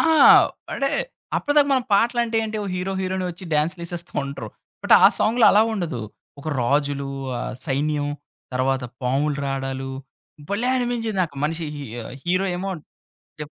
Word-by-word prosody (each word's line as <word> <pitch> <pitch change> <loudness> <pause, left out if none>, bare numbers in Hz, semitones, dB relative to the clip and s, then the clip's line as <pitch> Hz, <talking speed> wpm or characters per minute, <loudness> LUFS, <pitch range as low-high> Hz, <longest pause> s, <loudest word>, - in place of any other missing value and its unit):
ఆ! - - +4 0.7
అంటే 275 0 0 0.5
అప్పటిదాకా 290 -1 +3
మనం 260 -3 +2
పాటలంటే 235 +2 +2
ఏంటి 220 0 -4
ఓ - - -4
హీరో 185 +1 -2
హీరోయిన్ 190 0 -2
ఒచ్చి 175 +2 -11
డాన్స్‌లేసేస్తా 170 +2 -2
ఉంటరు. 140 -6 -6 0.3
బట్ - - +6
ఆ - - +10
సాంగ్‌లో 230 +2 +3
అలా 210 +2 +6
ఉండదు. 165 - -3 0.4
ఒక 155 - -5
రాజులు, 140 +2 0 0.3
ఆ - - -4 0.3
సైన్యం 145 +1 0 0.5
తరువాత 130 0 0 0.2
పాములు 140 +4 +1
రాడాలు 135 -1 -3 0.6
భలే 225 +5 0
అనిపించేది 240 -4 -1
నాకు 155 -5 -4
మనిషి 165 +2 -1
హీ 145 - -6 0.4
హీరో 185 +2 +1
ఏమో 195 +2 -3 0.7
డి 150 - -4
170 Hz, 140 wpm, -23 LUFS, 140-215 Hz, 0.7 s, ఆ